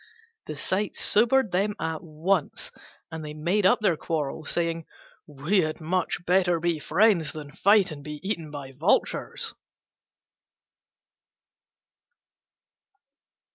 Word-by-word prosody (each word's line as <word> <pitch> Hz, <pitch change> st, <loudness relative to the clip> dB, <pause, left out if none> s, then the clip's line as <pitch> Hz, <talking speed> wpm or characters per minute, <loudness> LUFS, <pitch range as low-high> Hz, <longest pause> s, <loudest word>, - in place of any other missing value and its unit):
The -, -, -6 dB
sight 200 Hz, +2 st, -1 dB
sobered 235 Hz, +1 st, +3 dB
them 200 Hz, +3 st, 0 dB
at 160 Hz, -1 st, -2 dB
once, 165 Hz, +1 st, -2 dB, 0.4 s
and 160 Hz, -1 st, -6 dB
they 150 Hz, 0 st, -7 dB
made 180 Hz, +6 st, +2 dB
up 220 Hz, +3 st, +3 dB
their 190 Hz, -6 st, +3 dB
quarrel, 155 Hz, -1 st, -3 dB
saying, 165 Hz, 0 st, -2 dB, 0.4 s
"We 150 Hz, +8 st, 0 dB
had 155 Hz, -1 st, -2 dB
much 175 Hz, +1 st, -1 dB
better 175 Hz, -1 st, +3 dB
be 170 Hz, -1 st, 0 dB
friends 170 Hz, -1 st, +2 dB
than 150 Hz, -2 st, -8 dB
fight 200 Hz, +2 st, +4 dB
and 145 Hz, -2 st, -8 dB
be 150 Hz, 0 st, -7 dB
eaten 170 Hz, -7 st, -3 dB
by 145 Hz, -2 st, -8 dB
vultures." 155 Hz, +9 st, 0 dB
170 Hz, 115 wpm, -26 LUFS, 155-195 Hz, 0.4 s, fight